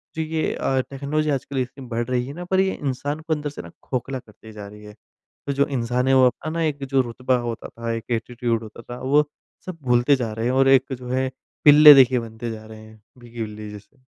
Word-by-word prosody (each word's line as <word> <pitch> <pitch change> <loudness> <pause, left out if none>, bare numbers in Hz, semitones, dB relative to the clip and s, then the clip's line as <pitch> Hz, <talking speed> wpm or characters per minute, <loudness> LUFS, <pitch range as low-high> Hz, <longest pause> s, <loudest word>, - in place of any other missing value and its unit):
जो 160 - -2
ये 160 0 -1
अ, 135 -1 0
टेक्नोलॉजी 145 +3 -2
आजकल 140 -1 -2
इतनी 130 +1 -7
बढ़ 120 0 -2
रही 125 -1 0
है 140 - -7
ना, 175 +3 -7
पर 190 +1 +1
ये 190 0 +2
इंसान 145 +2 -3
को 160 0 -2
अंदर 150 -1 -3
से 145 - -8
ना - - -12
खोखला 130 +1 -3
करती 110 -2 -16
जा 105 -2 -9
रही 105 +1 -13
है। 105 0 -12 0.5
तो 140 - 0
जो 140 +1 +2
इंसान 125 -1 -1
है, 135 - +4
वो 130 -1 +6
अपना 150 +5 -4
ना 165 +1 -2
एक 145 -3 -2
जो 135 0 +2
रुतबा 125 +1 -1
होता 115 - -5
था, 115 0 -5
एक 115 -1 -4
एटीट्यूड 115 0 -1
होता 110 +1 -11
था 125 +1 -6
वो 145 +3 +3 0.4
सब 185 -2 -7
भूलते 125 +2 +3
जा 120 -4 -3
रहें 115 +1 -3
हैं, 125 - +1
और 135 +1 +3
एक 135 0 +4
जो 125 -1 -8
है 130 +1 0 0.4
पिल्ले 150 0 +10
देखिए 130 -2 +5
बनते 115 0 -6
जा 110 -1 -9
रहें 110 0 -12
हैं, 110 0 -17 0.2
भीगी 120 -1 -9
बिल्ली 105 -1 -6
जैसे। 110 +6 -14
130 Hz, 240 wpm, -23 LUFS, 115-140 Hz, 0.5 s, पिल्ले